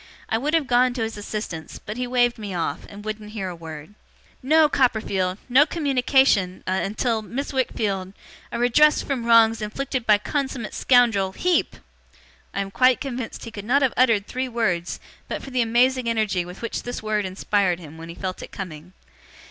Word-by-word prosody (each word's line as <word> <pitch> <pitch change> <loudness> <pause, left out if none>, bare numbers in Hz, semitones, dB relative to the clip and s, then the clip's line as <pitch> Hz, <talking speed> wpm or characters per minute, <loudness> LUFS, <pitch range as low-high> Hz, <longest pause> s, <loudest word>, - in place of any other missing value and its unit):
I 225 - +1
would 300 +6 0
have 320 -3 +2
gone 250 0 +3
to 235 - -1
his 225 0 -4
assistance, 205 -6 -6
but 210 - -7
he 250 +1 -3
waved 245 -1 +2
me 205 -3 -5
off, 170 - -3
and 205 +1 -11
wouldn't 215 0 -6
hear 195 -4 -3
a 180 - -6
word. 160 +1 -9 0.5
'No, 310 +4 +5
Copperfield! 210 -9 +1
No 265 +5 +5
communication 265 - +2
a - - -2
until 220 +2 -1
Miss 265 +7 -5
Wickfield 200 -7 -1 0.4
a - - -3
redress 245 +6 +4
from 250 -4 -3
wrongs 225 -1 +5
inflicted 250 +3 -3
by 210 -1 +6
consummate 265 0 -3
scoundrel 225 -7 +3
HEEP!' 360 - +1 0.8
(I 200 - -2
am 195 0 -5
quite 255 +4 +4
convinced 255 -4 -5
he 230 - -8
could 205 -3 -7
not 270 +6 +2
have 260 - +2
uttered 230 -5 +3
three 255 +3 -3
words, 185 -8 -1 0.3
but - - -5
for 270 - -9
the 250 -1 +1
amazing 240 +2 +2
energy 215 -6 0
with 180 +5 -10
which 230 - -3
this 245 -2 -6
word 215 -1 0
inspired 190 -1 0
him 160 -1 -11
when 165 0 -9
he 170 - -8
felt 185 -1 -5
it - - -9
coming.) 180 -2 -8
225 Hz, 190 wpm, -23 LUFS, 195-255 Hz, 0.8 s, by